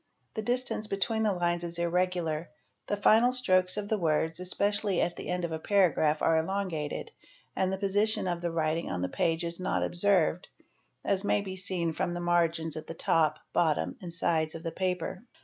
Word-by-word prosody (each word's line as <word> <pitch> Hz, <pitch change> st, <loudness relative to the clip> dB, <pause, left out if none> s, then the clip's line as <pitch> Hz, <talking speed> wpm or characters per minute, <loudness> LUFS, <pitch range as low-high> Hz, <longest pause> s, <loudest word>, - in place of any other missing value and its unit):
The 220 Hz, -, -3 dB
distance 240 Hz, -1 st, -1 dB
between 210 Hz, +3 st, -1 dB
the 215 Hz, -, +3 dB
_ 190 Hz, -3 st, -1 dB
lines 175 Hz, 0 st, 0 dB
is 170 Hz, 0 st, -4 dB
irregular; 170 Hz, -2 st, 0 dB, 0.4 s
the 205 Hz, -, -1 dB
final 225 Hz, +4 st, +5 dB
strokes 185 Hz, -7 st, +2 dB
of 205 Hz, -1 st, -3 dB
the 215 Hz, 0 st, 0 dB
words, 160 Hz, 0 st, +1 dB
especially 200 Hz, +1 st, 0 dB
at 175 Hz, -, 0 dB
the -, -, -7 dB
end 180 Hz, -1 st, -1 dB
of 170 Hz, -, -5 dB
a 160 Hz, -, -3 dB
paragraph, 160 Hz, -5 st, +2 dB
are 160 Hz, -1 st, +4 dB
elongated, 185 Hz, -, -3 dB, 0.4 s
and 190 Hz, 0 st, +1 dB
the 190 Hz, -, -1 dB
position 205 Hz, +1 st, +1 dB
of 175 Hz, -1 st, -2 dB
the 175 Hz, -, -1 dB
writing 165 Hz, 0 st, -1 dB
on 90 Hz, 0 st, -2 dB
the 90 Hz, -, -1 dB
page 165 Hz, -, 0 dB
is 170 Hz, +1 st, -3 dB
not 185 Hz, -, 0 dB
observed, 180 Hz, -1 st, +2 dB, 0.6 s
as 195 Hz, 0 st, +1 dB
may 205 Hz, -, +2 dB
be 190 Hz, -2 st, -6 dB
seen 180 Hz, -3 st, -1 dB
from 175 Hz, +2 st, -2 dB
the -, -, -3 dB
margins 170 Hz, -2 st, +1 dB
at 155 Hz, -, -7 dB
the 165 Hz, -, -6 dB
top, 155 Hz, -2 st, +2 dB, 0.2 s
bottom, 160 Hz, -3 st, +1 dB
and 175 Hz, -2 st, -6 dB
sides 165 Hz, -2 st, 0 dB
of 165 Hz, -, -7 dB
the 165 Hz, -, -3 dB
paper. 185 Hz, 0 st, -2 dB
175 Hz, 200 wpm, -29 LUFS, 165-195 Hz, 0.6 s, final